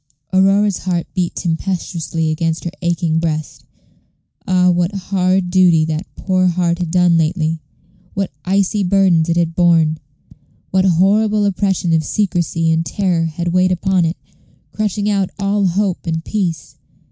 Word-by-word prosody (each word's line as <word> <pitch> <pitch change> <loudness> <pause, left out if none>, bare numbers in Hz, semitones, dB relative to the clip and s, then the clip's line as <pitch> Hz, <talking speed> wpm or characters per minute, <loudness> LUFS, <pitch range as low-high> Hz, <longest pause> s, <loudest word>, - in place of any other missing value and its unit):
Aurora's 195 +1 +3
heart 175 -2 -2
beat 180 -2 -2
tempestuously 165 -2 -2
against 165 +1 -2
her 170 - -4
aching 170 -2 0
breast. 155 -2 -4 0.8
Ah! 180 -1 +3
what 175 +1 0
hard 185 -1 0
duty 175 -4 +4
that 160 +3 -3
poor 185 -1 +1
heart 175 -1 0
had 175 -2 -2
done 175 -1 +3
lately; 160 0 0 0.6
what 195 -2 -2
icy 195 +2 +1
burdens 180 -3 +2
it 170 - +1
had 165 -1 0
borne, 165 -3 +2 0.7
what 190 0 +2
horrible 205 +4 +2
oppression 190 -3 0
of 160 -1 +2
secrecy 170 -3 0
and 160 0 +1
terror 175 -2 -1
had 170 +2 -3
weighed 185 +1 +2
upon 185 0 +1
it, 165 +1 -1 0.5
crushing 210 -1 -2
out 200 -3 0
all 200 0 +1
hope 185 0 -1
and 160 0 -2
peace! 175 -9 -3
180 Hz, 145 wpm, -17 LUFS, 165-190 Hz, 0.8 s, duty